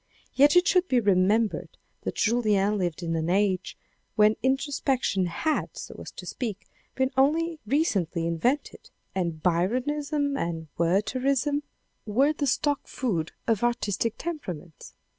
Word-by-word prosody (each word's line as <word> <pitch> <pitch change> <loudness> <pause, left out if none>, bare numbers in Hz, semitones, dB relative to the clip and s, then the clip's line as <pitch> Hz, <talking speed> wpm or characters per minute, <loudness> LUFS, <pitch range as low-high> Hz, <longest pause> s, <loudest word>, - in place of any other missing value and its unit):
Yet 290 +3 +5
it 355 0 +5
should 365 -1 +3
be 255 -6 +3
remembered 205 +1 +1 0.2
that - - -4
Julien 210 -3 +2
lived 175 -2 -2
in 165 -1 -1
an 160 +1 -1
age 190 0 +1 0.4
when 215 0 +5
introspection 265 -7 0
had, 310 - -2
so - - -8
to - - -8
speak, 215 -6 -5 0.3
been 260 0 +1
only 315 +4 +2
ecently 195 - +1
invented, 205 - -1 0.2
and 170 -4 -2
Byronism 280 - 0
and 165 - -3
Wertherism 255 - +1 0.5
were 255 +8 +3
INTRODUCTION - - +3
xiii. - - -3
the 285 - +1
stock 285 +1 0
food 180 -11 -2
of 225 -2 +1
artistic 230 -2 0
temperaments. 180 - -7
225 Hz, 135 wpm, -27 LUFS, 185-280 Hz, 0.5 s, Yet